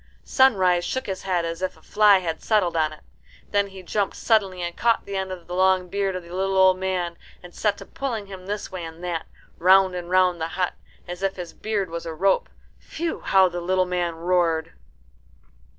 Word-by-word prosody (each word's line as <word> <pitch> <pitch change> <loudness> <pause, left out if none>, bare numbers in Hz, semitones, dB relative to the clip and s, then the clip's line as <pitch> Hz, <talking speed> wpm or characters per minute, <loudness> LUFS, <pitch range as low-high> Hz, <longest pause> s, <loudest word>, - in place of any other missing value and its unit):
Sunrise 190 -10 +4
shook 260 - -3
his 190 -1 -4
head 180 -3 0
as 165 +1 -4
if 185 - -3
a - - -20
fly 210 -1 +5
had 165 -4 -3
settled 200 -6 +1
on 155 -1 +2
it. 155 - -12 0.5
Then 200 0 +2
he 190 -1 -11
jumped 200 +2 -1
suddenly 195 -5 +1
and 175 0 -4
caught 230 -1 +1
the 200 - -5
end 190 -1 -2
of 180 -2 -7
the 175 - -8
long 185 0 +2
beard 195 0 -1
of 185 - -5
the 170 +1 -12
little 190 +1 0
old 185 -1 +5
man, 180 -2 -2 0.2
and 175 -1 -12
set 205 -2 0
to - - -10
pulling 235 -7 -4
him 190 -1 -10
this 205 +1 -4
way 185 -2 -5
and 165 +1 -9
that, 170 -2 -3 0.3
round 190 +1 +5
and 175 -1 -5
round 180 -2 +3
the 160 - 0
hut, 180 -1 0 0.3
as 175 +1 -7
if 195 0 0
his 175 -3 -7
beard 205 -5 -2
was 170 0 -5
a 160 - -5
rope. 195 +4 +2 0.3
Phew! 330 0 -4
how 190 -1 +4
the 175 0 -5
little 185 +1 +1
man 175 -2 -1
roared. 170 -1 0
185 Hz, 215 wpm, -24 LUFS, 175-195 Hz, 0.5 s, fly